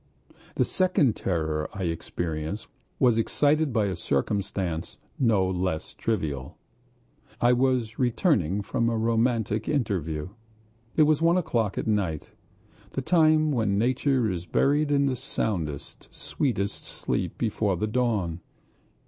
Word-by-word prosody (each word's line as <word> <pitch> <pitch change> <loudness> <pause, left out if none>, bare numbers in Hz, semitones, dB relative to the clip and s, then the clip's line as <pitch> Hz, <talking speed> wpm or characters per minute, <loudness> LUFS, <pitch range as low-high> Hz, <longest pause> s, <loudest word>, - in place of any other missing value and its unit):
The - - +2
second 180 - +2
terror 80 -4 -1
I 95 - -3
experienced 80 +2 -3 0.3
was 120 -3 +4
excited 145 +5 +2
by 110 -3 +2
a 95 -2 -1
circumstance 95 -1 -2 0.2
no 110 -8 +3
less 90 -3 -2
trivial.... 75 - -3 0.8
I 120 +1 +4
was 125 -3 +1
returning 110 - +1
from 115 +3 0
a 115 - 0
romantic 115 -1 +1
interview. 90 - -1 0.7
It 155 - +6
was 150 0 +3
one 170 +2 +4
o'clock 120 - 0
at - - -2
night, 95 -8 -1 0.6
the 135 - -2
time 155 -1 +4
when 110 -7 +1
nature 130 +2 +2
is 90 -1 -5
buried 145 +2 +2
in 140 -1 +3
the 135 -2 +1
soundest, 80 - -4
sweetest 100 -8 -2
sleep - - -3
before 100 -4 0
the 105 - 0
dawn. 105 -8 0
110 Hz, 125 wpm, -26 LUFS, 90-130 Hz, 0.8 s, It